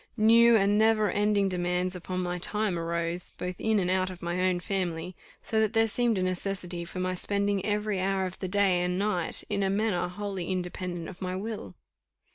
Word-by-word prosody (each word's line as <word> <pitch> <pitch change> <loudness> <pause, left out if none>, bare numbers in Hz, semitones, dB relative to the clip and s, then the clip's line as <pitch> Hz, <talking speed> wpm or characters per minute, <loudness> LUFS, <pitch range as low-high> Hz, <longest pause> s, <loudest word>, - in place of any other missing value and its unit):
New 230 +2 +6
and 205 0 +3
never 220 -1 +3
ending 205 -1 +2
demands 180 0 -1
upon 185 +1 -4
my 180 0 -2
time 210 -1 0
arose, 170 +1 -2
both 180 0 -4
in 220 -1 +2
and 180 -2 +1
out 185 0 +1
of 180 -2 -10
my 175 +1 -1
own 185 -1 +2
family, 180 -1 -3 0.3
so 220 - 0
that 220 -1 +2
there 225 0 +4
seemed 230 0 +1
a 185 - 0
necessity 185 -1 -3
for 185 - -7
my 185 0 -1
spending 200 +1 0
every 210 -1 0
hour 190 0 0
of 185 0 -6
the 190 - -3
day 190 -2 +3
and 180 0 0
night 190 -4 0
in 200 - -1
a 195 - +1
manner 195 -3 0
wholly 195 -1 -5
independent 180 -2 -3
of 190 - -10
my 185 0 -2
will. 195 - -5
185 Hz, 200 wpm, -28 LUFS, 180-205 Hz, 0.3 s, New